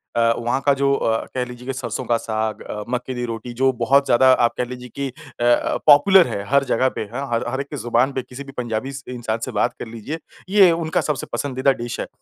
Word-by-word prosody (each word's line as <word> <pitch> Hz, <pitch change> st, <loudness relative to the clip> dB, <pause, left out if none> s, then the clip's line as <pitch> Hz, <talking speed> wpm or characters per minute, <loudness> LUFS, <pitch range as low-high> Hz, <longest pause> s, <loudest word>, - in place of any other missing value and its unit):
अ, 115 Hz, 0 st, +3 dB
वहाँ 120 Hz, +3 st, -1 dB
का 140 Hz, -, +5 dB
जो 140 Hz, 0 st, +1 dB
अ, 115 Hz, -4 st, 0 dB
कह 125 Hz, -, 0 dB
लीजिए 125 Hz, 0 st, -10 dB
कि 135 Hz, -, -2 dB
सरसों 125 Hz, -1 st, -4 dB
का 120 Hz, 0 st, +2 dB
साग 110 Hz, -1 st, -3 dB
अ, 105 Hz, -, -6 dB
मक्के 125 Hz, +1 st, -3 dB
दी 125 Hz, -1 st, -3 dB
रोटी 115 Hz, +1 st, -6 dB
जो 130 Hz, +2 st, +2 dB
बहुत 140 Hz, +1 st, +4 dB
ज़्यादा 130 Hz, +1 st, +5 dB
आप 120 Hz, -2 st, +2 dB
कह 125 Hz, -, 0 dB
लीजिए 125 Hz, 0 st, -8 dB
कि 140 Hz, 0 st, -2 dB, 0.3 s
अ, -, -, +1 dB
अ, 120 Hz, 0 st, +2 dB
पॉपुलर 170 Hz, +6 st, +7 dB
है 100 Hz, -, -4 dB
हर 140 Hz, 0 st, +4 dB
जगह 130 Hz, -1 st, +1 dB
पे, -, -, -3 dB
हाँ, 140 Hz, +3 st, -3 dB
हर 115 Hz, -, 0 dB
हर 130 Hz, +2 st, -2 dB
एक 140 Hz, -, -7 dB
की -, -, -6 dB
ज़ुबान 120 Hz, +2 st, +1 dB
पे, 130 Hz, -, -2 dB
किसी 125 Hz, +2 st, -10 dB
भी 135 Hz, -, -11 dB
पंजाबी 120 Hz, +1 st, -3 dB
स 135 Hz, 0 st, -8 dB
इंसान 120 Hz, -3 st, -3 dB
से 130 Hz, -, -6 dB
बात 120 Hz, +2 st, +1 dB
कर -, -, -6 dB
लीजिए, 115 Hz, +8 st, -6 dB, 0.3 s
ये 195 Hz, -3 st, +6 dB
उनका 165 Hz, +1 st, 0 dB
सबसे 150 Hz, -3 st, -2 dB
पसंदीदा 135 Hz, -1 st, +1 dB
डिश 120 Hz, 0 st, -5 dB
है। -, -, -3 dB
125 Hz, 250 wpm, -21 LUFS, 120-140 Hz, 0.3 s, पॉपुलर